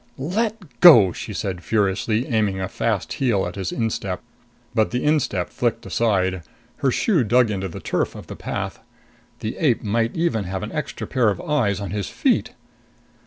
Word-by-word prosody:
"Let 210 - -1 0.2
go!" 115 - +9
she - - -6
said 90 -3 -4
furiously, 110 +2 +1
aiming 105 -5 0
a 95 - -2
fast - - -2
heel 115 -8 +1
at 90 - -5
his 95 -2 -4
instep. 100 -5 -2 0.5
But 110 - +2
the 125 - -2
instep 145 - +1
flicked 120 -1 -1
aside. 95 -5 +1 0.4
Her 135 - +1
shoe 165 - +2
dug 120 +1 +3
into 95 -1 -2
the 85 - -8
turf - - -1
of - - -9
the - - -8
path. - - -4 0.6
The 110 - -3
ape 135 -8 +2
might 115 +2 0
even 160 - 0
have 95 +2 -4
an 105 - -5
extra 150 -2 -4
pair 125 -5 +2
of 100 - -2
eyes 115 -10 0
on 100 -3 -5
his 100 -6 -3
feet! - - +1
110 Hz, 175 wpm, -22 LUFS, 95-125 Hz, 0.6 s, go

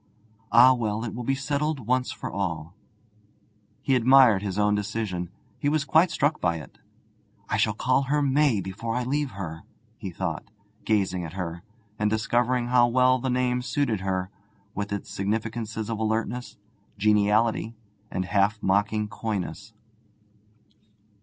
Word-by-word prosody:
'Ah 125 +3 +8
well, 110 -3 -2
it 110 - -5
will 120 - -5
be 135 +3 0
settled 145 -1 -2
once 125 +2 +1
for - - -6
all!' 85 -4 -3 1.1
He 135 - +1
admired 125 -4 +6
his 100 -2 -4
own 105 0 +3
decision; 105 -4 -2 0.3
he 145 - +1
was 150 -1 0
quite 160 +5 +4
struck 150 0 0
by 85 - +1
it. 80 - -10 0.7
'I - - +1
shall - - +1
call - - +2
her 145 +3 +1
May 140 -5 +2
before 110 +5 -4
I 125 - 0
leave 140 +2 -1
her,' 80 -5 -6 0.4
he 100 - -5
thought, 85 -3 -4 0.4
gazing 95 -4 +1
at 80 -1 -7
her, 85 -2 -5 0.4
and 105 0 +2
discovering 120 +3 +1
how 125 -1 +5
well 130 +1 +3
the 130 - -2
name 125 0 +1
suited 125 -3 -1
her, 95 0 -2 0.4
with 100 0 -4
its 100 -1 -4
significances 110 +2 -3
of 115 -2 -3
alertness, 115 +3 -2 0.4
geniality, 105 +2 +2 0.3
and 95 0 -2
half 100 +3 +2
mocking 100 +2 +1
coyness. 105 -1 -4
110 Hz, 145 wpm, -26 LUFS, 100-125 Hz, 1.1 s, Ah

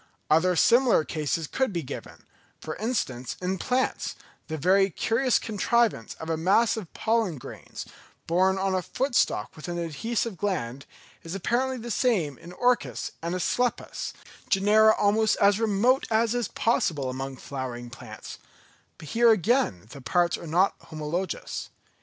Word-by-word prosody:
Other 180 +4 +4
similar 240 -1 +5
cases 155 +1 -2
could 260 - -1
be 170 -3 -3
given; 130 - -9 0.3
for 155 - -6
instance 130 - -2
in 185 +1 -2
plants, 255 +5 -1 0.3
the 160 - -4
very 190 +5 +4
curious 230 +7 +1
contrivance 220 - 0
of 160 - -8
a 165 -1 0
mass 200 +7 +3
of 210 -7 -7
pollen 220 -8 +1
grains, 125 - -9 0.4
borne 185 +3 +2
on 190 0 0
a 185 - +1
foot 250 +9 -2
stalk 105 - +1
with 155 - -9
an 175 0 -3
adhesive 190 - -2
gland, 140 -9 -3 0.3
is 165 +3 -6
apparently 250 +7 0
the 240 0 -6
same 190 - +1
in 170 - -11
Orchis 245 +6 0
and 170 +2 -2
Asclepias, 245 +7 -1 0.4
genera 215 +2 +5
almost 215 +2 +2
as 200 +1 +4
remote 230 +4 +2
as 225 0 +2
is 240 -4 -1
possible 160 - 0
among 135 +1 -5
flowering 125 -3 -6
plants; 115 -4 -10 0.6
but 155 - -10
here 235 0 +4
again 215 - +2
the 140 - -10
parts 175 +7 +2
are 170 - -8
not 180 +5 +3
homologous. 160 +3 -4
190 Hz, 150 wpm, -26 LUFS, 155-225 Hz, 0.6 s, similar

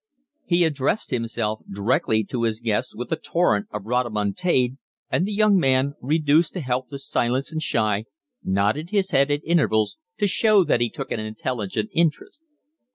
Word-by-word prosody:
He 175 0 +3
addressed 150 +5 0
himself 115 -3 -2
directly 110 - +1
to 120 +4 -4
his 110 -2 0
guest 115 -3 -1
with 120 +6 -6
a - - +3
torrent 135 -13 0
of 105 -1 -6
rhodomontade; 125 - 0 0.3
and 180 - +1
the - - -3
young 210 -1 +4
man, 135 -1 +2
reduced 150 +3 +2
to 180 - -4
helpless 130 +1 -4
silence 130 +5 0
and 160 0 -3
shy, 110 -7 0 0.4
nodded 105 - 0
his 195 -2 0
head 140 +1 +3
at 145 0 -1
intervals 155 - +1 0.2
to - - +1
show 205 0 +4
that 120 - +1
he 120 - +2
took - - -7
an - - -1
intelligent 110 -1 -3
interest. 165 - -1
130 Hz, 160 wpm, -23 LUFS, 110-165 Hz, 0.4 s, young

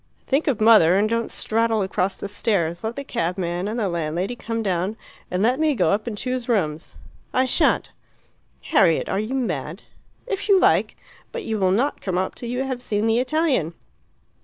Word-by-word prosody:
"Think 285 +4 0
of 265 -7 +1
mother 215 -6 +6
and 205 +2 +3
don't 230 +1 -1
straddle 225 -1 0
across 190 0 -1
the - - -5
stairs. 185 -5 -1
Let 220 +1 -3
the 280 - -5
cabman 180 -4 -2
and 225 +3 -3
the 210 - 0
landlady 170 +5 -2
come 230 -1 -4
down, 190 +2 -1 0.3
and 180 +2 -1
let 250 +5 +2
me 310 -2 +2
go 180 -7 +2
up 210 +3 -1
and 215 -3 -4
choose 255 +1 -3
rooms." 160 -9 -1 0.4
"I 255 - +4
shan't." 255 - +1 0.7
"Harriet, 195 - +3
are 195 - 0
you 220 +5 -3
mad?" 175 - -3 0.4
"If 405 -3 -4
you 390 -2 +6
like. - - +2 0.3
But 480 -3 -5
you 220 -1 -2
will 190 -1 +3
not 245 +10 0
come 185 -2 -2
up 190 +1 -1
till 240 - -7
you 250 +2 -1
have 260 -2 -4
seen 210 -3 -1
the 225 +1 +3
Italian." 255 - 0
215 Hz, 190 wpm, -23 LUFS, 185-250 Hz, 0.7 s, mother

